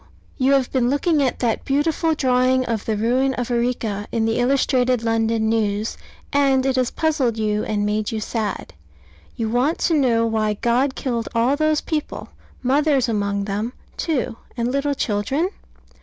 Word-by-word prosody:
You 265 +1 +3
have 270 -2 +2
been 250 -2 +1
looking 295 +2 +2
at 260 -3 0
that 235 -3 0
beautiful 315 +3 +1
drawing 255 -1 +2
of 225 -3 -2
the 220 -2 -1
ruin 255 +5 +1
of 245 0 -3
Arica 235 -4 -1
in 225 -1 0
the 225 +1 0
Illustrated 250 -1 +2
London 225 -1 +1
News: 215 -1 0 0.4
and 270 -2 +3
it 265 -1 +1
has 255 -2 +1
puzzled 280 -8 0
you 210 -1 0
and 205 -1 -1
made 210 0 -1
you 220 - -2
sad. 215 0 -3 0.6
You 225 - -2
want 250 +8 +1
to 335 - +2
know 245 -6 +3
why 215 -2 0
God 250 +5 +1
killed 235 -4 -2
all 240 +4 +3
those 310 0 +1
people 305 -2 -4 0.3
mothers 275 0 +2
among 200 -2 -1
them, 210 +4 -3 0.2
too, 260 -8 -2 0.2
and 235 +1 0
little 280 +1 0
children? 270 - -1
245 Hz, 165 wpm, -21 LUFS, 225-275 Hz, 0.6 s, You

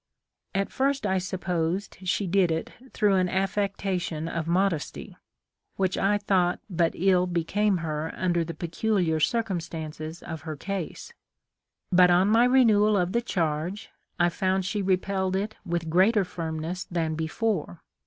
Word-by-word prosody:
At 195 0 0
first 275 -2 0
I 190 -1 +1
supposed 180 0 -2
she 200 - +1
did 185 0 +3
it 160 0 -2 0.2
through 205 -2 +2
an 185 -1 +2
affectation 190 -4 -1
of 165 -1 -3
modesty, 175 -2 -1 0.6
which 190 -1 0
I 205 +2 +2
thought 185 -3 +1
but 170 -4 +1
ill 185 0 +3
became 185 +4 +1
her 155 +1 -3
under 175 -2 +1
the 165 +1 -6
peculiar 175 -1 0
circumstances 165 -5 -2
of 160 -2 -6
her 155 +1 -5
case; 195 - -5 0.8
but 180 0 +6
on 180 +3 +4
my 230 +3 +5
renewal 215 -5 +4
of 180 -1 +1
the 235 +3 +1
charge, 170 -2 -2 0.3
I 175 0 +4
found 185 +2 0
she 205 +2 -1
repelled 190 0 0
it 210 +3 -2
with 170 -3 -2
greater 190 +5 +4
firmness 165 +1 -4
than 165 -3 -2
before. 160 - -2
185 Hz, 145 wpm, -26 LUFS, 165-200 Hz, 0.8 s, but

